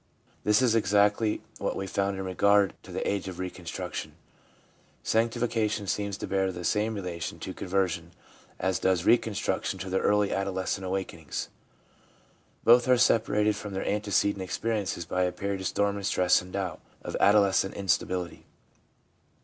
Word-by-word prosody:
This 105 +4 +4
is 120 -3 +4
exactly 105 +1 +2 0.2
what - - -2
we 95 - -3
found 100 +1 -1
in 95 - -4
regard 100 +1 +3
to - - -13
the - - -3
age 100 -1 -1
of 90 -2 -6
reconstruction. 90 -2 -5 0.9
Sanctifica 115 -1 +1
tion 105 -1 -3
seems 100 0 -2
to - - -5
bear 95 -1 0
the 90 -1 -7
same 110 +5 0
relation 90 -4 -5
to - - -6
conversion 90 -3 -1 0.5
as 95 0 0
does 95 -2 +1
reconstruction 110 -4 +1
to 95 0 -6
the 95 - +2
earlier 105 -1 +2
adolescent 95 -1 -2
awaken 95 -2 -3
ings. 75 -4 -5 1.1
Both 120 +2 +6
are 125 -1 +5
separated 105 -3 +3
from 105 -1 -6
their 95 - -3
antecedent 100 -1 +1
experi 115 -2 -1
ences 85 -3 -4
by 90 - -1
a 90 0 +2
period 100 +1 -3
of 95 - -1
storm 100 0 0
and 100 - -5
stress 90 -1 +3
and 90 0 -12
doubt, 95 -3 -3 0.2
of - - -5
adolescent 100 -1 +4
instability. 90 -2 -1
100 Hz, 160 wpm, -28 LUFS, 95-105 Hz, 1.1 s, Both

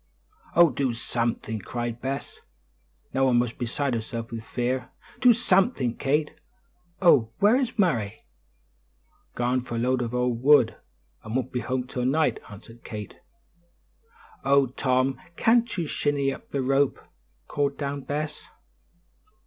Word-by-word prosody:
"Oh, 170 -3 +7
do 130 -1 -1
something!" 115 -2 -2
cried 120 +3 -4
Bess, 135 +1 -4 0.7
now 135 0 +3
almost 120 -2 +1
beside 130 +3 -1
herself 115 0 -4
with 115 -1 -5
fear; 125 +3 -2 0.3
"do 250 - +7
something, 195 - +2
Kate. 150 +2 0 0.7
Oh, 130 -10 +6
where 210 +4 +5
is 255 -2 -1
Murray?" 120 - 0 1.1
"Garn 125 +1 +1
for 120 -1 -6
a - - -1
load 125 +2 +1
o' 125 0 +1
wood, 125 0 +4 0.5
and 110 +2 -5
won't 130 -1 -1
be 125 - -1
home 125 0 -2
till 125 -1 -4
night," 155 +4 +2
answered 115 +3 -13
Kate. 105 -3 -8 1.2
"Oh, 140 0 +4
Tom, 130 0 0
can't 230 0 +2
you 170 - -1
shinny 145 -2 0
up - - -12
the 140 -2 -2
rope?" 135 +1 +2 0.5
called 140 -1 -1
down 140 -1 -3
Bess. 150 +2 -4
130 Hz, 135 wpm, -26 LUFS, 120-145 Hz, 1.2 s, Oh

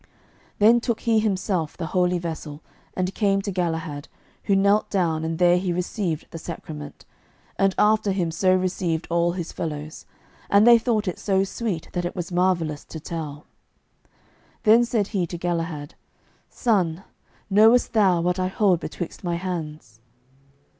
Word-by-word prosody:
Then 225 +3 +6
took 235 -2 -2
He 225 -2 +2
Himself 190 -6 -1
the 170 - -4
holy 180 -1 +2
vessel, 160 -3 -6 0.3
and 185 +1 -1
came 200 -2 +1
to 200 - -3
Galahad, 160 -4 -3 0.4
who 200 - +3
knelt 200 +2 +3
down 165 -5 0
and 160 0 -2
there 175 0 +4
he 180 -1 -2
received 175 -2 -2
the 165 - -7
sacrament, 150 -3 -8 0.5
and 195 -1 +2
after 210 -1 +3
him 180 -4 -1
so 185 +3 +3
received 180 -3 -1
all 170 0 +2
his 175 -2 -5
fellows; 155 -1 -6 0.4
and 200 +2 +5
they 235 -1 +8
thought 220 -3 0
it 180 - -3
so 195 -1 +1
sweet 195 -4 -4
that 175 - -1
it 175 - -4
was 180 -1 -5
marvellous 175 -4 0
to 160 - -8
tell. 150 -2 -6 1.2
Then 230 +1 +6
said 220 -4 -1
He 185 -5 -1
to 175 - -6
Galahad, 165 -4 -3 0.6
"Son, 190 -7 0 0.4
knowest 220 +5 +4
thou 190 -6 +3
what 180 +2 0
I 185 - +1
hold 190 -2 +2
betwixt 175 +1 -6
my 175 -1 -1
hands?" 155 - -6
180 Hz, 155 wpm, -24 LUFS, 165-200 Hz, 1.2 s, they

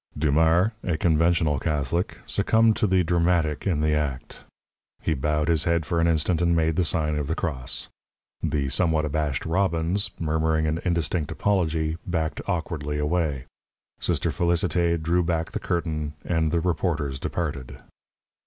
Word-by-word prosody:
Dumars, 80 +6 +3
a 85 -4 -1
conventional 80 -3 +2
Catholic, 75 +3 -1
succumbed 110 0 +3
to 115 -3 +2
the 95 -1 +3
dramatic 85 -1 +1
in 80 -6 +1
the 75 0 +2
act. 75 -4 -3 0.5
He 80 - 0
bowed 75 +2 0
his 80 -3 +2
head 85 -2 +1
for 85 +2 0
an 85 - +3
instant 85 +1 +1
and 85 -1 +3
made 80 -1 +1
the 90 - +2
sign 75 -3 0
of 70 - -3
the 80 - -1
cross. 65 -9 -3 0.5
The 70 -3 -1
somewhat 80 +2 +2
abashed 75 -2 -2
Robbins, 85 +2 +1
murmuring 80 0 +1
an 80 +1 0
indistinct 85 -3 0
apology, 80 -5 0
backed 80 -3 -2
awkwardly 80 -5 -2
away. 75 -3 -1 0.5
Sister - - 0
Félicité 85 0 +1
drew 85 +3 +1
back 80 -1 -1
the - - -3
curtain, 80 -3 -2
and 80 -2 +1
the 85 0 +1
reporters 80 -5 -1
departed. 70 -7 -4
80 Hz, 150 wpm, -25 LUFS, 75-85 Hz, 0.5 s, Dumars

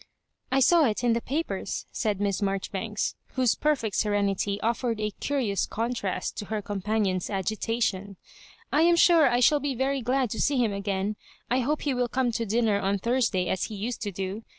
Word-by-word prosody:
" - - -54
I 270 +1 +3
saw 335 +3 +5
it 225 -1 -1
in 240 -1 +3
the 235 - 0
papers," 305 +8 -3
said 210 -4 -1
Miss 200 -1 0
Marjori 195 -1 -1
banks, 210 +1 -2 0.2
whose 255 -3 +3
perfect 265 -9 0
serenity 200 -1 0
offered 230 0 -1
a 210 0 -1
curious 250 -9 0
contrast 225 -5 -2
to 205 - -4
her 215 +1 -2
companion's 200 -2 -1
agitation. 200 -1 -2 0.6
"I 300 - +4
am 340 +1 +5
sure 335 -4 +6
I 245 0 +1
shall 295 +4 +5
be 285 -1 -2
very 270 +2 0
glad 250 -1 0
to - - -2
see 285 -1 +2
him 230 -5 +2
again. 200 +1 -2 0.3
I 250 - +3
hope 290 +5 -1
he 285 - 0
will 245 -1 0
come 250 0 0
to 230 0 -2
dinner 220 -1 +2
on 200 0 0
Thursday 230 -4 +1
as 185 - 0
he 215 - -7
used 225 +5 -4
to 205 -2 -3
do. 195 +3 -4
225 Hz, 195 wpm, -27 LUFS, 200-255 Hz, 0.6 s, sure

